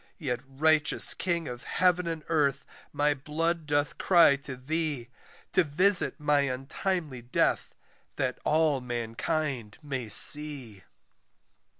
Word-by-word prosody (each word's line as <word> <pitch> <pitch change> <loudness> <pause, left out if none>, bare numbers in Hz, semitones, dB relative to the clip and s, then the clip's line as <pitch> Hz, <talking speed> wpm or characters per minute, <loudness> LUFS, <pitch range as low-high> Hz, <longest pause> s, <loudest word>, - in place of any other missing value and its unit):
"Yet 130 -8 -3
righteous 150 +2 +1
KING 170 -3 -3
of 125 0 -8
heaven 180 -1 0
and 165 -2 -5
earth 140 -4 0 0.3
my 145 0 +1
blood 160 +3 -3
doth 145 0 -1
cry 170 -6 +5
to 140 -1 -8
thee, 145 -2 -3 0.4
"To 185 - +4
visit 180 +5 +2
my 150 -1 +1
untimely 140 +2 -3
death 120 +1 -1 0.4
that 130 -1 -3
all 155 -3 +1
mankind 120 0 -4
may 130 -6 -5
see." 135 -4 +4
145 Hz, 115 wpm, -27 LUFS, 130-160 Hz, 0.4 s, cry